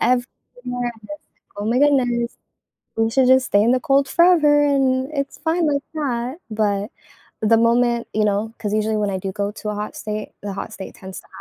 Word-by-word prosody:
everywhere 245 -1 +2 0.8
and 210 - -14 0.5
oh 205 - -4
my 230 +3 +1
goodness, 245 -4 +2 0.6
we 225 0 +2
should 260 +2 +3
just 260 0 +5
stay 200 - +3
in 230 - +3
the 255 - +3
cold 275 -2 +2
forever 305 -3 +5
and 265 -2 +1
it's 275 -1 -3
fine 325 +2 0
like 280 0 0
that, 255 -4 -2 0.2
but 210 -1 -1 0.5
the 225 +1 +4
moment, 235 +1 +2
you 215 0 +1
know 210 +2 0
'cause 210 -2 -3
usually 215 0 0
when 210 -1 0
I 190 - -2
do 190 +1 -4
go 200 +1 -2
to 215 - -7
a 210 - -3
hot 210 +1 -5
state, 215 0 -5
the 205 - -4
hot 200 +3 -6
state 190 - -8
tends 190 -1 -9
to - - -24
235 Hz, 200 wpm, -21 LUFS, 210-270 Hz, 0.8 s, just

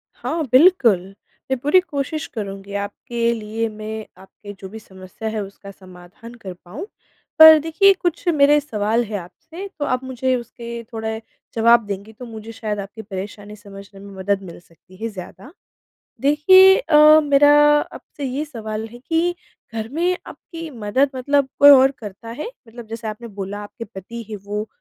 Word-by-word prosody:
हाँ, 320 +1 -3
बिल्कुल। 255 - +5 0.5
मैं 265 - +1
पूरी 295 +8 +4
कोशिश 305 -3 -4
करुँगी 195 -1 -6
आपके 235 +3 -2
लिए 225 0 -3
मैं 215 0 -7 0.2
आपके 205 +1 -12
जो 190 - -9
भी 220 +3 -9
समस्या 190 +2 -8
है 215 -1 -3
उसका 200 0 -11
समाधान 185 +4 -14
कर 185 -2 -6
पाऊँ। 200 - -7 0.5
पर 315 0 +11
देखिए 360 +6 +4
कुछ 350 0 -3
मेरे 295 0 +5
सवाल 225 -4 -1
है 210 -1 -4
आपसे 320 - -10
तो 290 - -1
आप 255 -1 -1
मुझे 260 0 -1
उसके 235 -1 -7
थोड़े 220 0 -4 0.3
जवाब 230 0 +4
देंगी 200 +2 -6
तो 250 +3 -10
मुझे 225 -1 -9
शायद 215 -3 -4
आपकी 200 +3 -8
परेशानी 205 +1 -8
समझने 200 -1 -13
में 200 0 -12
मदद 195 +1 -1
मिल 175 -2 -10
सकती 175 +2 -22
है 230 - 0
ज़्यादा। 205 - -11 0.7
देखिए 375 +7 +6
अ, 305 -8 +6
मेरा 290 0 +5 0.4
आपसे 285 - -10
ये 270 +3 -2
सवाल 220 -6 -6
है 240 - -11
कि 330 +6 -1 0.4
घर 220 0 -4
में 345 +7 0
आपकी 330 -1 -9
मदद 245 +4 0
मतलब 280 +1 +1
कोई 285 0 +9
और 265 -1 +7
करता 210 +1 -10
है? 240 +7 -6 0.2
मतलब 235 0 -11
जैसे 225 0 -6
आपने 215 +2 -7
बोला 200 0 -6
आपके 230 +3 -9
पति 230 +3 -9
है 215 - -4
वो 210 +1 -4
230 Hz, 165 wpm, -20 LUFS, 205-285 Hz, 0.7 s, पर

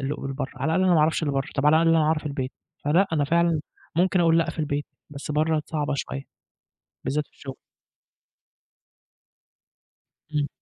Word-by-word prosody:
اللي 135 +2 -2
ق - - -9
برَّا، 135 0 -4
على 160 - -1
الأقل 185 - +3
أنا 180 - +5
ما 160 - +5
أعرفش 155 +2 +2
اللي 145 -3 0
برَّا، 135 +2 -1
طَب 140 +1 +1
على 150 +1 +6
الأقل 165 - +3
أنا 160 - +3
أعرف 155 0 +1
البيت، 135 -2 -3 0.3
فلأ 170 +7 +4
أنا 145 -3 +2
فعلًا 170 0 +2 0.4
ممكن 185 +1 +3
أقول 165 -1 +4
لأ 165 - +1
في - - -12
البيت، 145 -1 -1 0.3
بس 145 0 -7
برَّا 155 +1 +2
صعبة 150 -3 -1
شوية، 135 0 -4 0.8
بالذات 150 +1 -1
في - - -39
الشغل. 135 -2 -8 2.8
امم. 145 -1 +1
150 Hz, 180 wpm, -25 LUFS, 145-165 Hz, 2.8 s, على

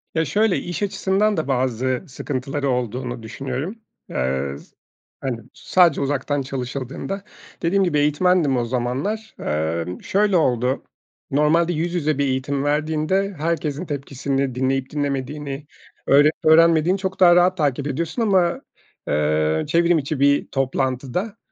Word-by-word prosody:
Ya 160 - +2
şöyle, 205 +7 +2
iş 175 +4 -4
açısından 200 +1 +1
da 155 - -1
bazı 130 +1 0
sıkıntıları 135 +1 -3
olduğunu 125 -1 -2
düşünüyorum. 135 - -4 0.3
Eee, 65 +2 -1
z - - -18 0.5
hani, 125 -4 -2
sadece 175 -6 +3
uzaktan 140 +1 -1
çalışıldığında 135 +8 -5 0.4
dediğim 195 +4 +2
gibi 150 -5 +1
eğitmendim 150 -1 +2
o 120 - 0
zamanlar. 130 - -2
Emm, 80 +3 -2
şöyle 200 -2 +2
oldu, 125 -3 +1 0.5
normalde 160 +4 +3
yüz 170 +2 -2
yüze 155 -4 0
bir 140 - +1
eğitim 135 +1 -1
verdiğinde 155 +6 0
herkesin 160 0 -2
tepkisini 140 -2 -2
dinleyip 130 0 0
dinlemediğini, 145 0 -3 0.4
öğrenip 145 +3 +6
öğrenmediğini 165 +2 +5
çok 190 -1 -4
daha 175 -2 +7
rahat 180 +1 +4
takip 145 -2 0
ediyorsun 165 - -2
ama, 185 -5 +2 0.5
eee, 75 +1 +1
çevrim 170 +2 +3
içi 145 -1 -2
bir 140 +1 +3
toplantıda 135 - -2
145 Hz, 130 wpm, -22 LUFS, 130-170 Hz, 0.5 s, daha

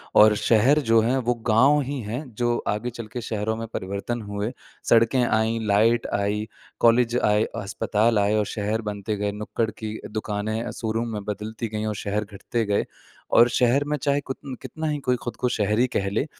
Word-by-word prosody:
और 105 0 +7
शहर 115 +7 +4
जो 115 - +7
है 125 +4 +1
वो - - +4 0.2
गाँव 135 +7 +5
ही 140 0 -3
हैं, 115 +6 -4
जो 120 0 +1
आगे 105 +4 -1
चल 115 -2 -8
के 120 - -3
शहरों 110 0 -2
में 115 0 -5
परिवर्तन 100 +5 -3
हुए। 105 +2 -3 0.4
सड़कें 115 +2 +4
आईं, 110 0 +1
लाइट 115 +4 +3
आई, 105 +2 -1 0.3
कॉलेज 120 +1 +4
आए, 105 +1 +3 0.2
अस्पताल 105 +2 +1
आए 100 +1 +2
और 105 - +1
शहर 105 +2 -1
बनते 100 +1 -3
गए। 105 0 -1
नुक्कड़ 105 +2 -2
की 110 0 -6
दुकानें 110 +1 -2
अ, 120 - -5
शोरूम 115 +1 -2
में 105 -1 -4
बदलती 105 +2 -4
गईं 105 0 -2
और 105 - -2
शहर 105 +1 0
घटते 110 +3 -3
गए। 100 0 +1 0.5
और 120 +1 +7
शहर 125 +4 +3
में 150 0 0
चाहे 140 +1 +1
कुतन 135 0 -7
कितना 160 0 -5
ही 150 -1 0
कोई 125 - +3
खुद 120 - -4
को 125 - 0
शहरी 105 +2 +2
कह 100 0 +1
ले, 110 +7 0
110 Hz, 195 wpm, -24 LUFS, 105-120 Hz, 0.5 s, और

